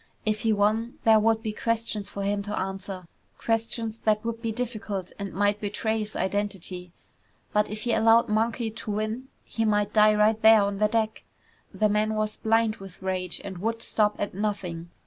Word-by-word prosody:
If 215 0 +1
he 225 - +1
won, 215 +3 +1
there 220 -1 +6
would 225 +1 +2
be 215 -2 -2
questions 225 -2 -2
for 200 - -5
him 200 +1 0
to 205 +1 -4
answer. 190 -1 -5 0.3
Questions 225 0 -1
that 215 0 +1
would 230 0 -3
be 230 -1 -1
difficult 215 -5 -4
and 200 -2 -4
might 205 +1 +1
betray 220 +2 -1
his 215 0 -5
identity. 190 -2 -3 0.6
But 210 0 +2
if 215 0 -5
he 240 - +1
allowed 225 +1 +5
Monkey 225 +1 0
to 225 -1 -6
win, 215 +5 -3 0.2
he 225 - -2
might 210 -1 +1
die 215 0 +6
right 215 +1 +3
there 220 -1 +7
on 200 0 -2
the 210 - +4
deck. 220 0 -1 0.5
The 215 - +2
man 215 +1 +1
was 215 0 -1
blind 225 0 +2
with 195 -1 -12
rage 185 -2 -2
and 190 -3 -7
would 225 +3 -2
stop 210 -1 +2
at 205 - -3
nothing. 180 -4 -3
215 Hz, 185 wpm, -26 LUFS, 200-225 Hz, 0.6 s, there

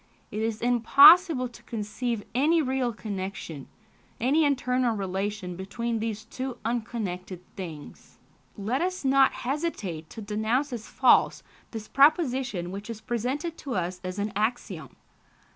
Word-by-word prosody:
it 215 - -3
is 225 -1 -2
impossible 255 - +7
to 240 0 -15
conceive 225 0 -3
any 305 +6 +3
real 260 -4 0
connection, 195 - -6 0.5
any 280 +7 +3
internal 255 -4 +1
relation 195 -1 -3
between 225 +5 -3
these 215 -1 -4
two 255 +2 -5
unconnected 215 -6 -3 0.2
things." 165 -6 -9 0.4
Let 220 +8 -1
us 365 -3 -2
not 270 0 +5
hesitate 240 - -4
to - - -10
denounce 220 +7 -1
as 225 -3 -6
false 260 - +3 0.3
this 220 -2 -7
proposition 265 - +2
which 200 +3 -7
is 230 -2 -5
presented 255 +9 -3
to 270 -4 -4
us 180 0 -2
as 185 +1 -5
an 205 +1 -2
axiom. 210 - -2
230 Hz, 130 wpm, -27 LUFS, 200-260 Hz, 0.5 s, impossible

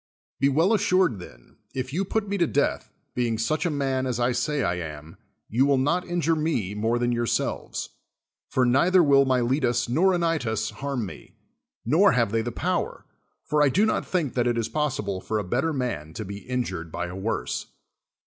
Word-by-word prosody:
Be 140 - +4
well 165 +10 +3
assured, 185 - +2
then, - - -14 0.2
if 130 0 -3
you 185 +5 +1
put 210 +2 -1
me 200 - -1
to 170 - +3
death, 145 0 0 0.2
being 120 -2 0
such 155 +9 0
a - - +1
man 135 -3 -1
as 125 -2 -2
I 120 +1 +2
say 130 +3 0
I 90 -3 0
am, 80 -1 -8 0.3
you 130 +6 +2
will 140 -1 +3
not 150 +7 +1
injiifc 165 -2 0
me 120 - -1
more 110 +3 0
than 120 0 +1
yourselves. 120 -1 -2 0.6
For 130 - +2
neither 170 +9 +4
will 140 -2 +5
.Miletus 125 -1 +1
nor 185 +9 +3
Anylus 165 -10 0
liar'm 135 -5 -3
me; 95 - -11 0.5
nor 165 - +5
have 115 -4 +2
they 115 0 +1
the 120 +2 -3
]>ower; 175 +7 -2 0.4
for 150 0 +1
I 145 - +5
do 200 +11 +3
not 215 - 0
think 170 -8 -1
that 120 -1 +1
it 120 -1 +1
is 115 - -1
possible 105 -11 -2
for 110 - -2
a 105 - -1
bettci 130 - 0
man 80 - -3
to 110 - -5
be 100 +1 -8
injur(>d 95 -10 -2
by 85 +2 -3
a 90 +1 -7
woi'se. 100 +4 -3
130 Hz, 195 wpm, -25 LUFS, 115-155 Hz, 0.6 s, will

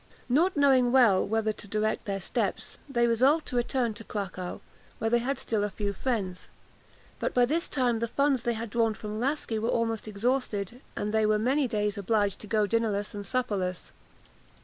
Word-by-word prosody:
Not 325 +7 +3
knowing 265 -4 +4
well 235 -9 +5
whither 220 0 0
to 205 - -11
direct 215 +2 -1
their 200 -2 -2
steps, 190 - -3
they 240 -3 +2
resolved 260 +7 +3
to - - -5
return 240 -1 0
to 225 +1 -10
Cracow, 190 -4 -5 0.4
where 225 0 -1
they 240 - +4
had 270 +4 -1
still 215 -2 -1
a 210 - 0
few 200 0 -3
friends; 195 -5 -3 0.7
but, - - -2
by 245 -1 +5
this 320 +7 0
time, 245 -4 +1
the 235 - -1
funds 275 +1 +1
they 240 0 0
had 225 -1 -5
drawn 225 -1 +2
from 215 0 -5
Laski 255 -3 -1
were 225 +2 -1
almost 225 -2 -1
exhausted, 225 0 -1 0.2
and 210 +1 -2
they 220 -1 +3
were 215 0 +3
many 260 +6 +2
days 210 -3 -1
obliged 205 -1 +1
to 215 - -9
go 215 0 +2
dinnerless 210 -1 0
and 205 -1 -6
supperless. 200 -8 -2
225 Hz, 190 wpm, -28 LUFS, 210-250 Hz, 0.7 s, well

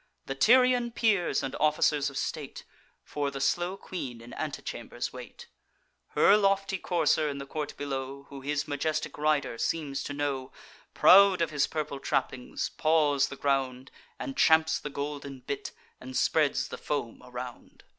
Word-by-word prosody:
The 135 - -3
Tyrian 245 - +4
peers 215 -10 +1
and 135 -1 -4
officers 150 -1 +2
of 140 - -8
state 145 -3 -4 0.4
For 145 -1 -2
the 140 0 -6
slow 175 +6 0
queen 130 -12 -6
in 120 +1 -12
antechambers - - -5
wait; - - -10 0.7
Her 205 - +6
lofty 195 -1 +1
courser, 155 -3 +1
in 140 - -4
the 140 - -6
court 150 +1 -5
below, 140 -1 -5
Who 140 -1 -9
his 145 +1 -2
majestic 155 +1 -2
rider 150 -6 +1
seems 145 -4 -1
to 145 - -4
know, 140 -2 -2 0.4
Proud 195 0 +7
of 165 - 0
his 145 -2 +1
purple 150 -3 -4
trappings, 130 -2 -2
paws 150 -3 +3
the - - -8
ground, 135 -2 -1 0.3
And 270 - -5
champs 160 -7 +4
the 150 - -6
golden 140 -2 -5
bit, 140 +2 -4 0.3
and 130 0 -6
spreads 155 -3 +2
the - - -7
foam 140 -6 -3
around. 125 0 -9
145 Hz, 155 wpm, -29 LUFS, 135-160 Hz, 0.7 s, Proud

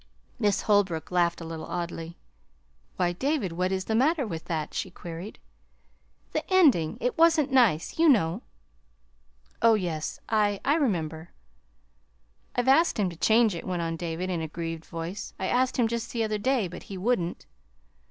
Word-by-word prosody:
Miss 205 -4 +1
Holbrook 195 -7 +1
laughed 175 -1 +1
a - - -6
little 160 -1 -6
oddly. 170 -1 -5 0.8
"Why, 180 -1 +1
David, 265 - -1
what 180 +2 -1
is 190 0 -1
the 220 - -2
matter 275 +5 +2
with 165 -6 -6
that?" 155 -3 -3
she 190 - -3
queried. 175 +3 -8 0.9
"The - - -1
ending; 255 - +4
it 250 +5 -2
wasn't 320 -4 +4
nice, 235 - +2
you 330 -1 +6
know." 200 - +3 1.2
"Oh, 230 -1 +6
yes, 170 -6 -3
I 210 -2 +1
I 280 - +4
remember." 170 - -1 1.3
"I've 245 +1 0
asked 320 +6 +4
him 195 -4 +1
to - - -10
change 220 +4 +3
it," 170 - -6
went 180 -2 -1
on 165 0 -2
David, 170 +2 -3
in 170 -2 -2
a 160 - -3
grieved 165 0 -5
voice. 170 +5 -6
"I 190 - -3
asked 255 +5 +1
him 240 -3 +3
just 230 0 -3
the 230 -2 -1
other 215 -1 -1
day, 250 -2 +1
but 175 +1 -9
he 195 - -5
wouldn't." 185 -4 -1
190 Hz, 170 wpm, -27 LUFS, 170-240 Hz, 1.3 s, you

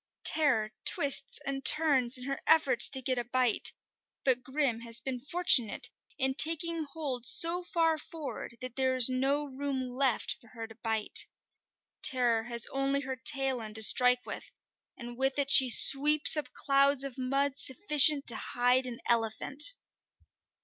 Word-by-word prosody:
Terror 250 -9 0
twists 280 -1 0
and 275 0 -5
turns 270 -6 +2
in 250 - -10
her 275 +1 -7
efforts 275 -7 +1
to 265 -1 0
get 255 -1 -3
a - - -5
bite; 245 -1 -1 0.5
but 255 -2 0
Grim 260 -2 -4
has 230 0 -5
been 260 -2 -8
fortunate 280 - 0 0.3
in 265 -2 -2
taking 330 +3 +2
hold 275 -5 -5
so 340 +5 +7
far 325 -3 -3
forward 295 -6 -11
that 255 -1 -9
there 260 -1 -2
is 255 -1 +5
no 270 +3 -3
room 270 -1 -7
left 255 -1 -4
for 230 - -21
her 225 -1 -9
to 225 - -16
bite. 220 -1 -3 0.7
Terror 240 -3 +2
has 235 -2 +2
only 275 +1 -3
her 265 -1 -8
tail 265 -1 -1
end 215 -1 -10
to 220 - +5
strike 250 +2 +3
with, - - -10 0.5
and 240 -1 -12
with 270 +1 -2
it 280 -1 -1
she 260 -2 +6
sweeps 295 +6 +7
up 300 - -6
clouds 275 -1 0
of 275 -2 -10
mud 275 +2 -3
sufficient 290 0 +3
to 235 - -2
hide 250 +3 -3
an 235 -2 -11
elephant. 235 - -2
265 Hz, 160 wpm, -27 LUFS, 245-285 Hz, 0.7 s, so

